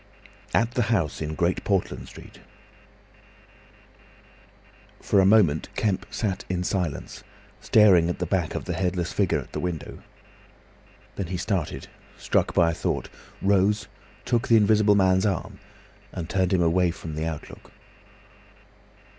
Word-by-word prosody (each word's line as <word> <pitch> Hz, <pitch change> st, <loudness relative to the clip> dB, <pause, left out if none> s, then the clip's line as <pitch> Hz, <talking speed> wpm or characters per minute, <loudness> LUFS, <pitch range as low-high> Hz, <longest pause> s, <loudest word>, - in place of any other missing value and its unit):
AT 115 Hz, +1 st, +2 dB
THE 125 Hz, -, 0 dB
HOUSE 95 Hz, -12 st, 0 dB
IN 80 Hz, 0 st, -3 dB
GREAT 85 Hz, +3 st, 0 dB
PORTLAND 95 Hz, -3 st, -1 dB
STREET -, -, -13 dB, 2.6 s
For 100 Hz, -, +2 dB
a 95 Hz, -, +5 dB
moment 95 Hz, -8 st, +3 dB
Kemp 100 Hz, -2 st, -1 dB
sat 100 Hz, -4 st, -3 dB
in 90 Hz, -1 st, -1 dB
silence, 90 Hz, +2 st, -3 dB, 0.4 s
staring 100 Hz, -7 st, +5 dB
at 85 Hz, -, -2 dB
the 90 Hz, -, -2 dB
back 90 Hz, -1 st, -1 dB
of -, -, -4 dB
the -, -, -3 dB
headless 90 Hz, -2 st, -2 dB
figure 100 Hz, -4 st, +1 dB
at -, -, -7 dB
the -, -, -4 dB
window. 90 Hz, -3 st, -5 dB, 1.2 s
Then 100 Hz, -, -3 dB
he 90 Hz, +1 st, -3 dB
started, 90 Hz, -4 st, -3 dB, 0.3 s
struck -, -, 0 dB
by 85 Hz, -1 st, +4 dB
a -, -, -4 dB
thought, -, -, -3 dB, 0.3 s
rose, 100 Hz, +1 st, +2 dB, 0.4 s
took 120 Hz, +1 st, 0 dB
the 115 Hz, -, +6 dB
Invisible 105 Hz, -1 st, +4 dB
Man's 95 Hz, 0 st, +3 dB
arm, 95 Hz, -4 st, -3 dB, 0.5 s
and 85 Hz, -3 st, -6 dB
turned 95 Hz, 0 st, 0 dB
him 90 Hz, -2 st, +3 dB
away 90 Hz, +2 st, +2 dB
from 80 Hz, -2 st, -7 dB
the 80 Hz, +1 st, -3 dB
outlook. 80 Hz, -2 st, -8 dB
95 Hz, 140 wpm, -25 LUFS, 85-100 Hz, 2.6 s, the